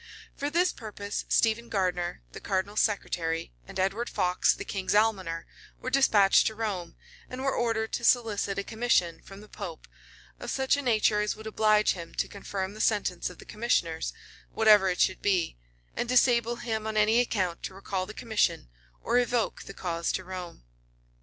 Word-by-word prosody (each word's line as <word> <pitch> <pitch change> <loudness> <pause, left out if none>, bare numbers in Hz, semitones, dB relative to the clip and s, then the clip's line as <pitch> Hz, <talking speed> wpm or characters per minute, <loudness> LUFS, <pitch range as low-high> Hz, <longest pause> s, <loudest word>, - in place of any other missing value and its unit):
For 285 - -2
this 350 +4 +2
purpose, 205 -2 -5
Stephen 230 +1 +2
Gardiner, 180 - -1
the - - -9
cardinal's 195 +2 -1
secretary, 165 - -1
and - - -7
Edward 195 +6 0
Fox, 180 0 +2
the - - -7
king's 190 0 -2
almoner, 190 -6 +1 0.3
were 255 - -5
despatched 210 -8 +5
to 220 - -3
Rome, 195 -6 -4 0.3
and 255 +1 -6
were 270 - +1
ordered 225 -2 0
to - - -2
solicit 220 -5 +2
a 200 - -1
commission 210 -8 +1
from 195 +1 -12
the 210 - -13
pope, 185 -7 -8 0.5
of - - -6
such 265 0 +2
a 285 - -2
nature 215 -4 +2
as 210 - -1
would 220 - -12
oblige 215 -1 +3
him 170 -2 -9
to - - 0
confirm 195 -1 -5
the 215 - -6
sentence 200 -5 +1
of 180 - -12
the - - -13
commissioners, 170 - -1 0.4
whatever 210 -3 +6
it 180 - -2
should 185 - +2
be, 185 - +1 0.4
and 240 - -2
disable 240 -2 +3
him 220 -2 -3
on 215 0 -2
any 215 +2 +4
account 190 -8 0
to 190 - -6
recall 190 -1 -3
the 215 - -9
commission, 220 - 0 0.3
or 240 +2 +3
evoke 240 -2 0
the - - -9
cause 170 -2 -2
to 185 - -2
Rome. 180 - -8
210 Hz, 180 wpm, -28 LUFS, 185-230 Hz, 0.5 s, whatever